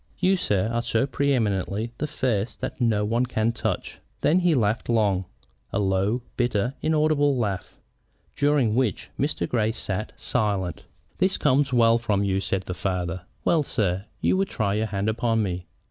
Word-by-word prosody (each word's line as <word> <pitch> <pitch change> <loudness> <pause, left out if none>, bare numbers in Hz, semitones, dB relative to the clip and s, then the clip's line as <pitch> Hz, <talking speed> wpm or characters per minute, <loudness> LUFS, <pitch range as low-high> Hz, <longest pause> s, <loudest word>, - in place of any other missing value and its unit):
You, 185 +1 +3
sir, 100 - +1
are 120 - +1
so 115 +2 +1
pre 140 +1 0
eminently 105 -2 0
the 150 - -1
first 120 -6 -1
that 130 0 -5
no 110 -3 +2
one 120 +4 +1
can 110 -1 +1
touch 115 - -3
you." - - -21 0.2
Then 170 +4 +4
he 175 -3 +3
laughed 110 -2 0
long, 100 -5 +2 0.5
a - - -1
low, 100 +4 +1
bitter, 120 0 +1
inaudible 150 -3 +2
laugh, 100 -6 -3 0.6
during 145 -6 +2
which 120 -6 0
Mr. 85 - 0
Grey 110 -2 +1
sat 105 -1 -4
silent. 100 - -1 0.3
"This 185 +1 +2
comes 140 -1 +2
well 115 -1 +4
from 105 -4 0
you!" 95 -1 +1
said 95 -1 -1
the 90 - -4
father. 90 -2 -2 0.2
"Well, 165 - +4
sir, 100 -8 -1 0.2
you - - +3
would 195 0 0
try 105 -4 0
your 110 +2 0
hand 100 0 -2
upon 115 0 +1
me. 90 -2 -3
110 Hz, 175 wpm, -25 LUFS, 100-130 Hz, 0.6 s, Then